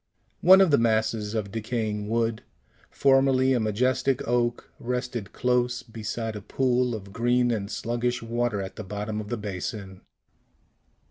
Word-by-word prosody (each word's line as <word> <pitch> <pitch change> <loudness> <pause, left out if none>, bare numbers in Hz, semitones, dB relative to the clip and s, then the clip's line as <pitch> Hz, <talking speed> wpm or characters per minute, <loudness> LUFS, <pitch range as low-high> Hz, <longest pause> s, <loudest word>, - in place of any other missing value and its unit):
One 190 +2 +8
of 190 -4 +4
these 140 - +5
masses 110 -1 0
of 105 -3 -2
decaying 110 -2 -3
wood, 115 -1 0 0.5
formerly 135 -1 +3
a 125 - +2
majestic 125 +5 0
oak, 120 0 0
rested 125 -3 -3
close 125 0 0
beside 115 -1 -5
a 105 - -6
pool 125 +2 0
of 100 -2 -9
green 120 +2 +2
and 100 -3 -2
sluggish 120 +2 -2
water 115 -3 -1
at 95 - -8
the 110 - -5
bottom 105 +2 -4
of 105 - -9
the 120 - -2
basin. 100 -1 -6
115 Hz, 145 wpm, -26 LUFS, 105-125 Hz, 0.5 s, One